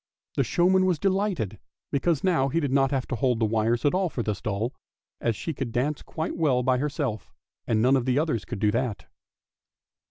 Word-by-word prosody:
The -, -, +3 dB
showman 185 Hz, +1 st, +3 dB
was 180 Hz, -3 st, +2 dB
delighted, 190 Hz, -, 0 dB, 0.3 s
because 145 Hz, +2 st, +1 dB
now 165 Hz, -8 st, +3 dB
he 165 Hz, -, +1 dB
did 145 Hz, -5 st, -1 dB
not 135 Hz, 0 st, +3 dB
have 135 Hz, -2 st, -1 dB
to 130 Hz, -, -1 dB
hold 125 Hz, 0 st, +1 dB
the 115 Hz, -, +3 dB
wires 115 Hz, +3 st, +1 dB
at 145 Hz, -, +3 dB
all 185 Hz, -1 st, +1 dB
for 120 Hz, -, -3 dB
this 105 Hz, -3 st, -3 dB
doll, 110 Hz, +4 st, -2 dB, 0.5 s
as 115 Hz, -2 st, 0 dB
she 160 Hz, -, -4 dB
could 135 Hz, -4 st, -4 dB
dance 140 Hz, +5 st, -1 dB
quite 160 Hz, +1 st, -4 dB
well 140 Hz, -7 st, +2 dB
by 130 Hz, 0 st, +2 dB
herself, 140 Hz, -, -3 dB, 0.4 s
and 110 Hz, -1 st, +2 dB
none 130 Hz, +2 st, +5 dB
of 130 Hz, -3 st, +1 dB
the 130 Hz, 0 st, +1 dB
others 150 Hz, -8 st, 0 dB
could 120 Hz, -, -6 dB
do 105 Hz, +1 st, +2 dB
that. 115 Hz, -2 st, -2 dB
130 Hz, 210 wpm, -26 LUFS, 115-160 Hz, 0.5 s, none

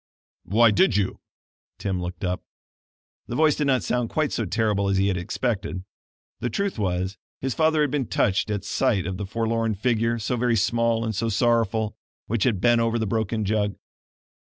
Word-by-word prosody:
"Why 110 Hz, +4 st, +5 dB
did 190 Hz, -, +3 dB
you?" 95 Hz, -2 st, -1 dB, 0.6 s
Tim 95 Hz, -2 st, -2 dB
looked 90 Hz, +1 st, -6 dB
up. 90 Hz, 0 st, -1 dB, 0.9 s
The 120 Hz, -, -4 dB
voice 155 Hz, 0 st, +4 dB
did 150 Hz, -, 0 dB
not 130 Hz, -2 st, +2 dB
sound 125 Hz, -2 st, -1 dB
quite 155 Hz, -2 st, 0 dB
so 115 Hz, -, -1 dB
terrible 100 Hz, -1 st, +1 dB
as 100 Hz, -, +1 dB
he 100 Hz, +1 st, +3 dB
had 95 Hz, -, 0 dB
expected. 95 Hz, 0 st, -2 dB, 0.6 s
The 120 Hz, -, -2 dB
truth 200 Hz, -, -2 dB
was 95 Hz, -1 st, -1 dB, 0.2 s
his 130 Hz, -1 st, -2 dB
father 160 Hz, -1 st, +2 dB
had 145 Hz, -3 st, +1 dB
been 140 Hz, -5 st, -1 dB
touched 100 Hz, +2 st, +1 dB
at 105 Hz, -1 st, -2 dB
sight 105 Hz, -4 st, +1 dB
of 95 Hz, 0 st, -3 dB
the 100 Hz, 0 st, -4 dB
forlorn 115 Hz, +1 st, 0 dB
figure, 115 Hz, +2 st, +1 dB
so 115 Hz, +2 st, -2 dB
very 120 Hz, 0 st, +2 dB
small 115 Hz, +1 st, +1 dB
and 110 Hz, -, -2 dB
so 115 Hz, +3 st, -1 dB
sorrowful, 110 Hz, -1 st, +1 dB, 0.3 s
which 110 Hz, -2 st, 0 dB
had 115 Hz, -7 st, +1 dB
bent 120 Hz, +2 st, +4 dB
over 115 Hz, 0 st, +1 dB
the 110 Hz, -, 0 dB
broken 110 Hz, +1 st, -1 dB
jug. 105 Hz, -1 st, 0 dB
110 Hz, 185 wpm, -24 LUFS, 100-120 Hz, 0.9 s, Why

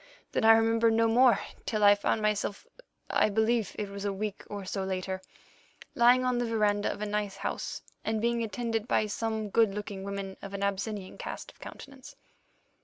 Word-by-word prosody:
Then -, -, 0 dB
I 225 Hz, 0 st, +9 dB
remember 225 Hz, +1 st, +4 dB
no 225 Hz, 0 st, +3 dB
more 245 Hz, +2 st, +5 dB, 0.3 s
till 215 Hz, -2 st, 0 dB
I 205 Hz, 0 st, +9 dB
found 205 Hz, +1 st, 0 dB
myself—I 210 Hz, -, -2 dB
believe 220 Hz, 0 st, +1 dB
it 210 Hz, -, -2 dB
was 200 Hz, 0 st, -7 dB
a 200 Hz, -, 0 dB
week 205 Hz, +1 st, -4 dB
or 205 Hz, -2 st, -6 dB
so 195 Hz, +1 st, -3 dB
later—lying 190 Hz, +6 st, -1 dB
on 250 Hz, -1 st, +1 dB
the 240 Hz, -, 0 dB
verandah 210 Hz, -2 st, +1 dB
of 210 Hz, -, -5 dB
a -, -, 0 dB
nice 205 Hz, -1 st, -2 dB
house, -, -, -4 dB, 0.2 s
and 220 Hz, 0 st, -1 dB
being 235 Hz, +1 st, +1 dB
attended 225 Hz, +1 st, -2 dB
by 215 Hz, -, +2 dB
some 220 Hz, 0 st, -2 dB
good 220 Hz, -3 st, +3 dB
looking 205 Hz, -2 st, -5 dB
women 200 Hz, -1 st, -5 dB
of 200 Hz, 0 st, -7 dB
an 200 Hz, -, -3 dB
Abyssinian 200 Hz, 0 st, -3 dB
cast -, -, -6 dB
of -, -, -28 dB
countenance." 275 Hz, -1 st, -11 dB
210 Hz, 180 wpm, -29 LUFS, 200-225 Hz, 0.3 s, I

